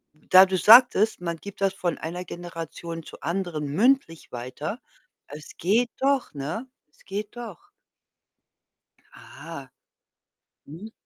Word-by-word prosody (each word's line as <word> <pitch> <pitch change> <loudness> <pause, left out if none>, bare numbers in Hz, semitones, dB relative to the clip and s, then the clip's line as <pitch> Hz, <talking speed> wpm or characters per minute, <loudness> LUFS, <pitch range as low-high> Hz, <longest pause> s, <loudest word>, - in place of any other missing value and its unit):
da 185 +5 +6
du 190 0 -1
sagtest, 220 +1 +6
man 170 -1 -3
gibt 200 +4 -11
das 195 -1 +2
von 175 -3 -2
einer 175 +3 -6
Generation 165 -1 -7
zur - - -13
anderen 170 -2 -3
mündlich 190 - +1
weiter. 125 +1 -6 0.5
Es 150 +1 -11
geht 225 +7 +2
doch, 275 -1 +1
ne? 155 - -5 0.2
Es - - -27
geht 205 +4 -6
doch. 225 -8 -9 1.4
Ah. - - -11 1.0
Mhm. 180 +10 -10
180 Hz, 120 wpm, -25 LUFS, 165-215 Hz, 1.4 s, da